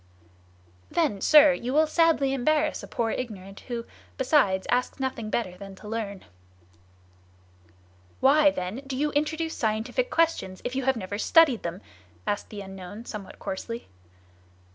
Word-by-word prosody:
"Then, 290 - 0
sir, 300 -2 +7
you 255 0 -3
will 310 +2 +5
sadly 310 -4 +3
embarrass 300 +4 +1
a - - -9
poor 230 -3 -1
ignorant, 200 -5 -6
who, 235 -2 -4 0.3
besides, 230 -9 +3
asks 250 +3 0
nothing 255 -5 -3
better 200 -6 -2
than 195 +1 -10
to 210 - -12
learn." 210 -3 -4 1.9
"Why, 295 +2 +6
then, 185 -5 -4
do 265 -1 -3
you 295 +2 0
introduce 315 +2 -1
scientific 225 - -1
questions 325 - 0
if 245 - -2
you 265 -1 -1
have 265 -2 +2
never 205 0 -5
studied 300 -3 +5
them?" 170 +3 -5 0.4
asked 205 - -2
the 205 -2 -7
unknown 195 +3 -9
somewhat 210 -4 -8
coarsely. 230 +4 -6
240 Hz, 140 wpm, -26 LUFS, 200-295 Hz, 1.9 s, sir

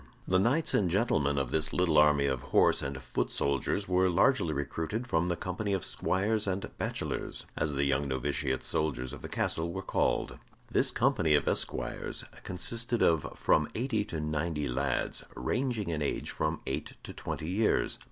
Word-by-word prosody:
The 95 0 +3
knights 135 +11 +2
and 95 -4 +3
gentlemen 80 - +1
of 70 -2 -1
this 80 -1 0
little 90 -3 +2
army 75 -2 +5
of 65 -3 0
horse - - +3
and 70 -1 -4
foot 65 -1 -2
soldiers 70 +8 0
were 90 0 +3
largely 95 - +3
recruited 80 - -3
from 85 -7 +1
the 90 - 0
company 95 +4 -3
of 95 - -1
squires 105 +3 0
and 95 0 -3
bachelors, - - -3
as 75 -1 -1
the 70 0 +1
young 70 0 +1
novitiate 65 +1 -1
soldiers 70 -4 -1
of 75 - -8
the - - -7
castle 80 +1 -1
were 95 +2 -5
called. - - 0 0.3
This - - +4
company 80 -2 +3
of 75 - +1
esquires - - -1 0.2
consisted 115 +5 -1
of 80 -3 +2
from 75 -1 +3
eighty 115 -3 0
to 85 -6 -4
ninety 75 0 -1
lads, 65 0 -1
ranging 120 -7 -1
in 80 -2 -2
age 70 - -2
from - - -2
eight 70 +3 -3
to - - -8
twenty 80 - -5
years. 105 +4 +1
80 Hz, 170 wpm, -30 LUFS, 70-100 Hz, 0.3 s, army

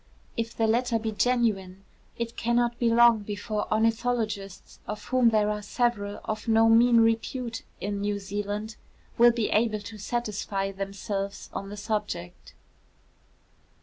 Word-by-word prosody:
If 230 0 -3
the 225 - +2
letter 235 +1 +2
be 220 0 -3
genuine, 210 -5 0 0.3
it 235 0 -4
cannot 235 0 +1
be 235 - +3
long 235 -1 +6
before 210 +1 -4
ornithologists, 220 -3 -1
of 210 0 -5
whom 255 -2 +4
there 210 -1 +2
are 210 0 -3
several 205 -2 -1
of 215 +1 -4
no 225 0 +5
mean 230 +1 +6
repute 225 +1 0 0.2
in 200 0 -3
New 205 0 -1
Zealand, 205 +2 -4 0.4
will 240 0 +8
be 230 -2 -1
able 215 -1 +1
to 215 +1 -9
satisfy 205 -3 -2
themselves 195 +1 -5
on 195 - -5
the 205 - -7
subject. 205 -5 -4
220 Hz, 140 wpm, -27 LUFS, 205-235 Hz, 0.4 s, will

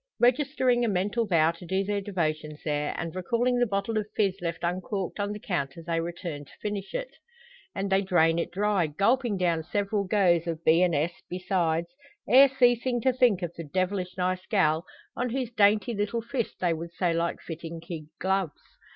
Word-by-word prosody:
Registering 250 -1 +3
a - - +2
mental 205 +4 0
vow 165 -3 +4
to 170 +2 -14
do 190 +3 0
their 205 0 -1
devotions 155 -6 -2
there, 150 -1 -1
and 165 0 -4
recalling 240 +7 +1
the 245 - +3
bottle 205 +2 -1
of 210 - -4
fizz 195 -4 +2
left 170 -1 -4
uncorked 185 +2 -2
on 205 0 -1
the 210 - -4
counter 165 -5 -3
they 165 -1 0
return 170 -3 -5
to 140 - -18
finish 205 - -4
it. - - -3 0.6
And 195 0 -2
they 190 0 +4
drain 170 -3 +3
it - - -2
dry, 200 -2 +1
gulping 215 - +1
down 170 -3 +1
several 200 +4 -1
goes 180 -4 +3
of 165 -1 -4
B 165 +2 +5
and 180 -3 +3
S, 160 +4 0 0.2
besides, 175 -2 0 0.4
ere 270 +2 +8
ceasing 245 -1 +2
to 260 +2 +3
think 240 -7 +3
of 175 -1 -3
the 165 - -7
"devilish 185 +3 -2
nice 185 0 -1
gal," 165 -5 +2 0.3
on 250 0 -1
whose 250 -1 -2
dainty 210 0 +3
little 210 +2 -2
fist 235 0 -3
they 175 -2 +2
would 165 +1 -6
so 180 -1 0
like 170 +1 -1
fitting 165 0 -7
kid 165 -2 -7
gloves. 190 -4 -1
185 Hz, 190 wpm, -27 LUFS, 170-210 Hz, 0.6 s, ere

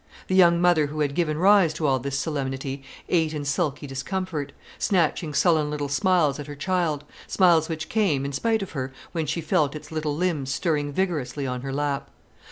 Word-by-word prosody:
The 185 - +1
young 170 -2 +6
mother 175 -4 +4
who 150 +1 -4
had 145 -2 0
given 155 -1 0
rise 185 -3 +5
to 155 - -2
all 135 -2 +2
this 135 +2 -3
solemnity 135 -2 -3 0.3
ate 160 -3 +1
in 145 -1 -4
sulky 145 0 -1
discomfort, 145 +2 -4 0.3
snatching 170 -5 +1
sullen 155 -3 +3
little 145 -1 -3
smiles 155 -2 +2
at 145 - -6
her 145 - -7
child, 160 -2 -1 0.2
smiles 170 -4 +4
which 160 -1 -4
came, 165 -11 +1
in 140 - -4
spite 220 +8 +1
of 195 - -8
her, 135 -3 -4 0.2
when 160 -3 -2
she 155 +4 -1
felt 155 -3 +1
its 150 - -9
little 155 -2 -2
limbs 155 -7 -1
stirring 145 -2 0
vigorously 145 -6 -2
on 125 -1 -3
her 135 +1 -5
lap. 140 0 -2
155 Hz, 190 wpm, -25 LUFS, 140-175 Hz, 0.3 s, young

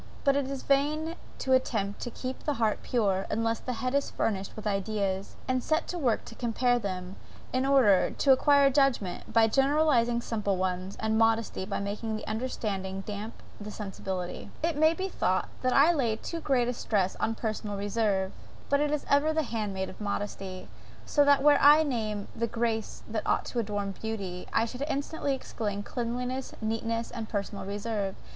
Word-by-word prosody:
But 275 -1 +4
it 280 -1 0
is 275 -1 -4
vain 305 +4 +1 0.2
to 260 - +1
attempt 210 -6 +1
to 245 - -3
keep 255 +2 -5
the 295 - -1
heart 220 -3 +1
pure, 195 -6 0
unless 225 +1 0
the 255 - -4
head 255 - 0
is 280 0 +1
furnished 195 -3 -2
with 215 - -8
ideas, 195 -1 -1
and 255 -1 +1
set 315 +6 +1
to 355 - -3
work 245 -7 +1
to - - -9
compare 245 +1 +1
them, 185 -3 -5 0.4
in 260 +1 +1
order, 245 -9 +5
to 275 - +2
acquire 280 +1 +5
judgment, 265 -9 +1
by 225 0 +5
generalizing 270 -1 +3
simple 210 -5 -1
ones; 185 +1 -2
and 220 0 +1
modesty 225 -3 +2
by 200 - -2
making 210 +2 -3
the 215 - -7
understanding 205 -4 -3
damp 210 +2 -7 0.2
the 210 0 -7
sensibility. 190 -3 -5
It 330 -1 +1
may 315 +2 +4
be 380 +1 -2
thought 185 - 0
that 255 -1 +2
I 295 +5 +6
lay 240 -8 +1
too 335 +9 -5
great 260 -6 +2
a 245 - 0
stress 200 -5 0
on 225 - 0
personal 215 -2 -3
reserve; 200 -2 0 0.4
but 280 - +3
it 295 0 +2
is 300 -1 -1
ever 290 +3 +3
the 315 0 +1
hand 220 -5 -2
maid 190 0 -3
of 185 - -11
modesty. 195 -2 -4 0.4
So 290 - +4
that 285 -1 +5
were 295 0 +6
I 295 +2 +8
to - - -3
name 215 -5 -2
the 235 0 0
graces 225 -1 -2
that 215 -1 -3
ought - - +2
to 245 - -3
adorn 205 -2 -2
beauty, 195 -3 -5
I 225 - +3
should 250 +3 -7
instantly 280 0 -1
exclaim, 205 -5 -4
cleanliness, 250 +3 -3
neatness, 225 +1 -2
and 225 -2 -5
personal 200 -1 -3
reserve. 205 -1 -2
225 Hz, 185 wpm, -29 LUFS, 205-265 Hz, 0.4 s, I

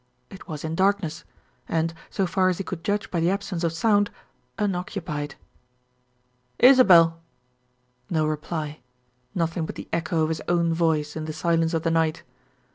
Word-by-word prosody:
It 195 - -12
was 150 -3 -6
in 160 0 -3
darkness; 190 -3 0 0.4
and, 165 0 0 0.2
so 195 - 0
far 185 +1 +2
as 180 - -1
he 195 - -3
could 175 -3 -6
judge 205 +2 -1
by 175 - 0
the 165 +1 +2
absence 195 -3 -2
of 165 - +1
sound, 205 +4 +2 0.5
unoccupied. 180 -7 -3 1.2
"Isabel!" 180 -11 +7 0.9
No 155 -2 +1
reply. 155 0 -3 0.6
Nothing 165 -1 -1
but - - -6
the - - -8
echo 165 -1 0
of 155 - 0
his 160 - -2
own 170 -1 +2
voice 160 -3 0
in 155 -1 -4
the 155 - -4
silence 165 +1 +1
of 160 - -1
the 165 - +1
night. 165 0 +1
165 Hz, 160 wpm, -25 LUFS, 160-185 Hz, 1.2 s, Isabel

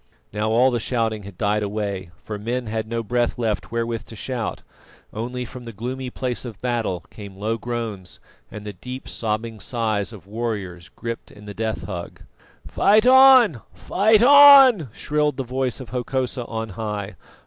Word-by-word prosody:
Now 105 +1 -1
all 125 +4 +4
the 120 - 0
shouting 115 -2 -1
had 100 -2 -11
died 105 0 +1
away, 100 -3 -3
for 105 +2 -6
men 120 +4 -3
had 110 0 -3
no 115 0 -3
breath 120 +2 0
left 110 -3 -2
wherewith 115 -1 -2
to 115 - -11
shout, 120 0 -4 0.5
only 125 +3 -4
from 125 +1 -10
the 115 - -7
gloomy 125 +4 -5
place 125 -1 -3
of 115 -5 -8
battle 115 -8 -2
came 100 -3 -10
low 110 +3 -2
groans 115 -6 -5 0.3
and 105 0 -9
the 105 - -6
deep 125 +8 -8
sobbing 110 0 -3
sighs 110 -4 -2
of 105 -5 -12
warriors 100 -5 -5
gripped 115 0 -7
in 105 0 -15
the 105 - -7
death 110 +1 -3
hug. 90 -4 -7 0.4
"Fight 215 +3 +3
on! 255 - +7
Fight 205 - +3
on!" 270 - +8
shrilled 150 +4 -1
the 135 - -2
voice 130 0 -2
of 130 -5 -9
Hokosa 125 +1 -2
on 110 -1 -4
high. 105 -1 -5
115 Hz, 170 wpm, -22 LUFS, 105-125 Hz, 0.5 s, on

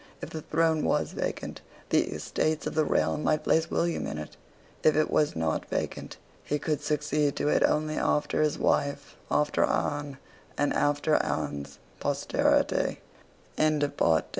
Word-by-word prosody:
If - - -7
the 160 - -5
throne 160 0 +1
was - - +1
vacant, - - -4 0.3
the - - +3
Estates 155 0 -1
of - - -3
the 155 -1 +2
Realm 80 - +1
might 155 0 +1
place 160 +1 +2
William 170 0 0
in 75 - -4
it. 75 0 -7 0.5
If 155 - +4
it 155 0 +2
was 150 - +2
not 80 -1 -1
vacant, - - -4 0.3
he 150 - -1
could 150 0 -2
succeed 150 -1 0
to 145 - 0
it - - +3
only 155 0 +1
after 150 - +1
his 150 -1 +1
wife, 140 0 0
after 150 0 +2
Anne, 145 -2 -1 0.4
and 145 - +1
after 145 +1 +2
Anne's 70 -1 -3 0.2
posterity. - - +1
150 Hz, 145 wpm, -28 LUFS, 145-155 Hz, 0.5 s, If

